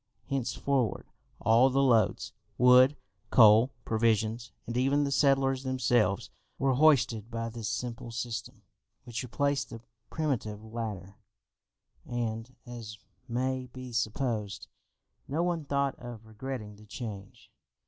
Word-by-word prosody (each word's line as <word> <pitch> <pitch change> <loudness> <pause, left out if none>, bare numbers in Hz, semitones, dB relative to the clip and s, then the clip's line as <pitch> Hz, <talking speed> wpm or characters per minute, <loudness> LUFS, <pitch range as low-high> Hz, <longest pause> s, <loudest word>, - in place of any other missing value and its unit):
Henceforward 130 -2 -1 0.3
all 115 +4 +5
the 135 +1 +2
loads, 115 -6 +2 0.2
wood, 125 +3 +6 0.3
coal, 110 +1 +7 0.2
provisions, 115 +1 +1
and 115 - -5
even 135 +3 +2
the 140 - -1
settlers 135 -1 +3
themselves, 125 -6 +1 0.3
were 135 0 +2
hoisted 125 -6 +3
by 115 0 -3
this 115 -2 -5
simple 120 0 -4
system, 115 -1 -5 0.4
which 120 -2 -5
replaced 140 +3 -1
the 115 - -8 0.3
primitive 115 -9 -2
ladder, 110 -3 -6 0.9
and, 120 +1 -4
as 115 -3 -8 0.3
may 130 +2 -1
be 130 -1 -8
supposed, 115 -3 -2 0.6
no 155 +5 0
one 170 -3 -1
thought 140 -1 0
of 120 -3 -9
regretting 110 -1 -7
the 105 - -15
change. 105 -3 -8
120 Hz, 120 wpm, -29 LUFS, 110-130 Hz, 0.9 s, coal